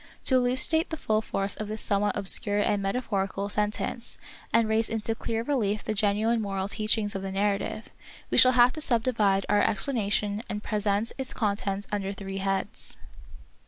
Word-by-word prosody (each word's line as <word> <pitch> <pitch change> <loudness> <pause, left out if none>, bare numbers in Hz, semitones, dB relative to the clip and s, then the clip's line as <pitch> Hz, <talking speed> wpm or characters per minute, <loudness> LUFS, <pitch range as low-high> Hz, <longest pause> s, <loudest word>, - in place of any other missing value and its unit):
"' - - -33
To - - +5
elucidate 260 +6 +4
the 320 - -4
full 215 -6 0
force 195 -2 -1
of 215 - -5
this 215 +1 -5
somewhat 205 0 0
obscure 205 +1 +3
and 205 0 +1
metaphorical 195 -2 -2
sen 210 0 +1
tence, 235 +2 -5 0.3
and 230 -1 +3
raise 220 +1 +1
into 225 0 -2
clear 225 0 -3
relief 220 -7 -1
the - - -2
genuine 215 +2 +1
moral 195 -2 -3
teachings 215 0 +1
of 195 - -4
the 195 0 -5
narrative, 200 +2 -2 0.4
we - - +1
shall 255 0 +7
have 250 0 +5
to 310 - -5
subdivide 220 -7 +1
our 205 - +3
explanation 210 -3 0
and 210 0 -4
present 210 +1 -1
its 265 - -4
contents 200 -2 -2
under 200 -1 -2
three 195 -1 -7
heads. 195 0 -3
210 Hz, 175 wpm, -27 LUFS, 200-230 Hz, 0.4 s, shall